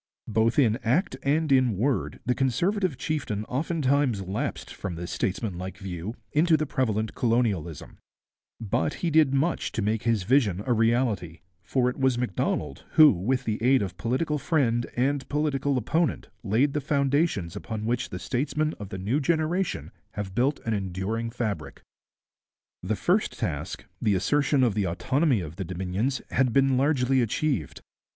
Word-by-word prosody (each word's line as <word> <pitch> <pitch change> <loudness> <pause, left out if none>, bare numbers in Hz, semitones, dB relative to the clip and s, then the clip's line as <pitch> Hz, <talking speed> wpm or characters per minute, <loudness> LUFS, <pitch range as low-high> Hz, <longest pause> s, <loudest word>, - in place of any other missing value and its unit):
Both 110 +1 +1
in 115 -6 +4
act 130 - +1
and 150 +2 +1
in 130 -6 +3
word 130 +6 -1
the 125 - +2
Conservative 155 - 0
chieftain 130 -8 -2
oftentimes 140 - 0
lapsed 95 +3 -4
from 90 -3 -5
this 85 +1 -6
statesmanlike 95 -2 -3
view 95 +3 -6 0.2
into 160 +1 +4
the 155 - -1
prevalent 110 -6 -1
colonialism; 110 - -1 0.6
but 115 +6 -1
he 165 - +1
did 155 -3 +5
much 140 +5 0
to 110 - -1
make 110 +1 0
his 115 -4 +1
vision 105 -5 +2
a 125 - +2
reality, 115 -7 +1 0.2
for 125 +8 0
it 125 - -2
was 130 -2 +2
Macdonald 90 - -2
who, 155 -2 +8
with 125 +8 -1
the 110 -3 -2
aid 130 0 +4
of 95 -3 -5
political 130 - -1
friend 125 -6 +1
and 135 +2 0
political 145 -2 0
opponent, 160 +8 0
laid 120 +7 +2
the 150 - -1
foundations 140 - 0
upon 110 -2 -5
which 120 +2 -1
the 90 - -5
statesmen 150 - -1
of 100 -2 -7
the 95 - -5
new 105 +10 0
generation 165 +5 0 0.2
have 100 -2 -5
built 130 +7 +1
an 115 - -2
enduring 100 +4 -2
fabric. 110 -9 -4 1.0
The 100 +4 -1
first 185 - +1
task, 75 -3 -4 0.2
the 105 -2 +2
assertion 140 +8 +2
of 120 -4 +3
the 100 -2 0
autonomy 130 - +1
of 80 0 -8
the 95 - -2
Dominions, 95 +9 -2
had 130 -2 +2
been 135 -1 +4
largely 135 -1 +2
achieved. 120 - -1
120 Hz, 160 wpm, -26 LUFS, 100-140 Hz, 1.0 s, who